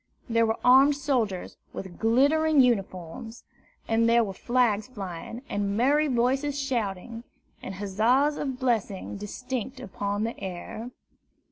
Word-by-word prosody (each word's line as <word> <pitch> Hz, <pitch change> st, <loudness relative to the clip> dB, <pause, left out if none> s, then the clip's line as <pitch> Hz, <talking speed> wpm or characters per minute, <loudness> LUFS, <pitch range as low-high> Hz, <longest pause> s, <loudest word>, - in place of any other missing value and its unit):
There 230 Hz, -1 st, +2 dB
were 220 Hz, -, 0 dB
armed 270 Hz, +3 st, +7 dB
soldiers 250 Hz, -10 st, -1 dB, 0.2 s
with 190 Hz, -3 st, -8 dB
glittering 285 Hz, +7 st, +3 dB
uniforms, 225 Hz, -1 st, 0 dB, 0.4 s
and 230 Hz, 0 st, +3 dB
there 235 Hz, 0 st, +5 dB
were 195 Hz, -3 st, -4 dB
flags 235 Hz, -1 st, +1 dB
flying, 205 Hz, +1 st, -7 dB
and 200 Hz, 0 st, -1 dB
merry 290 Hz, +6 st, +3 dB
voices 270 Hz, +3 st, +1 dB
shouting, 230 Hz, -4 st, -3 dB, 0.4 s
and 195 Hz, -, -6 dB
huzzas 225 Hz, +9 st, +2 dB
and 270 Hz, -4 st, -3 dB
blessings 220 Hz, -6 st, -1 dB
distinct 250 Hz, +4 st, -5 dB
upon 205 Hz, -3 st, -3 dB
the 230 Hz, +1 st, -3 dB
air. 190 Hz, +5 st, -6 dB
230 Hz, 125 wpm, -27 LUFS, 205-260 Hz, 0.4 s, armed